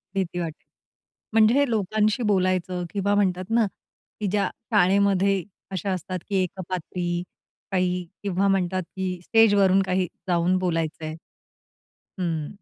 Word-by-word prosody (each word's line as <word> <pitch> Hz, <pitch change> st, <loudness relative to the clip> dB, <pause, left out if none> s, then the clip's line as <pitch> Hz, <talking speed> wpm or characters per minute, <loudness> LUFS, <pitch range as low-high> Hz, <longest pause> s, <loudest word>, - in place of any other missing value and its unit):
भीती 180 Hz, -2 st, -1 dB
वाटेल. 165 Hz, -3 st, -5 dB, 0.7 s
म्हणजे 225 Hz, +6 st, +5 dB
लोकांशी 215 Hz, +2 st, +1 dB
बोलायचं 185 Hz, -3 st, +1 dB
किंवा 200 Hz, 0 st, +1 dB
म्हणतात 185 Hz, -2 st, +1 dB
ना, 230 Hz, -2 st, +4 dB, 0.5 s
की 210 Hz, -, -1 dB
ज्या 200 Hz, -2 st, +1 dB, 0.2 s
शाळेमध्ये 195 Hz, -1 st, +3 dB, 0.3 s
अशा 190 Hz, +1 st, -2 dB
असतात, 185 Hz, +1 st, -4 dB
की 200 Hz, -, -1 dB
एकपात्री, 180 Hz, -1 st, -3 dB, 0.5 s
काही 180 Hz, -1 st, 0 dB, 0.2 s
किंवा 195 Hz, 0 st, +1 dB
म्हणतात, 185 Hz, -1 st, +1 dB
की 185 Hz, 0 st, -4 dB
स्टेज 225 Hz, 0 st, +5 dB
वरून 195 Hz, -1 st, +5 dB
काही 185 Hz, -1 st, +1 dB, 0.2 s
जाऊन 175 Hz, +1 st, +2 dB
बोलायचंय. 160 Hz, -3 st, -2 dB, 1.0 s
हं. 165 Hz, -4 st, -1 dB
185 Hz, 120 wpm, -25 LUFS, 180-200 Hz, 1.0 s, म्हणजे